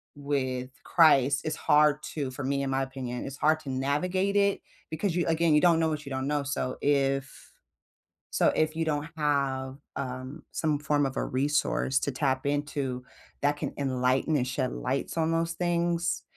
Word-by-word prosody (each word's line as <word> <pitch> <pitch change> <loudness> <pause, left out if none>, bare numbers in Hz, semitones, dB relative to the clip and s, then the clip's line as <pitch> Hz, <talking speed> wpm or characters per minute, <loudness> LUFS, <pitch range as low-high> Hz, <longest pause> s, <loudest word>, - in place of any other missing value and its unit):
with 130 -3 -2
Christ, 140 -4 +4
it's 155 -1 -1
hard 150 0 +3
to 140 -4 -2
for 135 +1 -6
me, 140 +1 0
in 135 - -2
my 135 0 0
opinion, 130 -2 -5
it's 140 +1 -7
hard 155 +1 +2
to 140 - -8
navigate 175 +9 0
it, 200 -1 +3 0.3
because 165 +3 -1
you 175 - +1
again, 165 -1 +3
you 150 - +5
don't 170 -2 +5
know 160 - +2
what 150 -2 -4
you - - -7
don't 130 0 -2
know, 145 -1 0
so 135 -2 -3
if 135 -1 0 0.8
so, - - +3
if 155 0 +1
you 165 - 0
don't 150 0 -1
have, 135 -3 0 0.2
um, 130 +3 -5
some 150 -2 0
form 145 -1 +1
of 135 - -3
a - - 0
resource 135 0 +1
to - - -2
tap 130 0 -1
into, 140 -3 -2 0.4
that 145 +1 +3
can - - -3
enlighten 130 +2 +1
and 125 - 0
shed 125 0 -1
lights 135 +5 -2
on 160 0 +1
those 165 0 0
things, 170 -1 0
145 Hz, 185 wpm, -28 LUFS, 135-155 Hz, 0.8 s, you